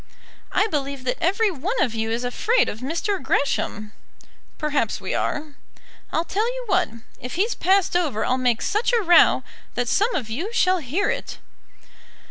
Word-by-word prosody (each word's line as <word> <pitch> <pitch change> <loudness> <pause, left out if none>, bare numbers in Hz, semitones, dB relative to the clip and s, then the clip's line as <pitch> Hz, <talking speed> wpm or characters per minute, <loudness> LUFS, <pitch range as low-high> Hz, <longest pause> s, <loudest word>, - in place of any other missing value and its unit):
"I - - +3
believe 280 -8 -3
that 250 - -2
every 400 +5 +2
one 365 - -3
of 245 - +1
you 225 0 -2
is 230 +2 -1
afraid 445 - +1
of 215 - -6
Mr. 335 - -2
Gresham." 240 -6 -1 0.7
"Perhaps 290 -9 0
we 190 - -4
are." 300 0 -2 0.6
"I'll 330 - 0
tell 425 +6 0
you - - -5
what. 375 - +2 0.3
If 250 +1 -6
he's 415 +7 +1
passed 380 -1 +2
over 300 -12 +1
I'll 255 +1 +1
make 245 -3 +1
such 425 +4 +1
a 470 - +4
row 345 -2 +6 0.3
that 245 0 -1
some 425 - +2
of 250 -7 -2
you 310 - -4
shall 370 -5 +3
hear 330 +8 0
it." - - -5
310 Hz, 170 wpm, -23 LUFS, 250-395 Hz, 0.7 s, row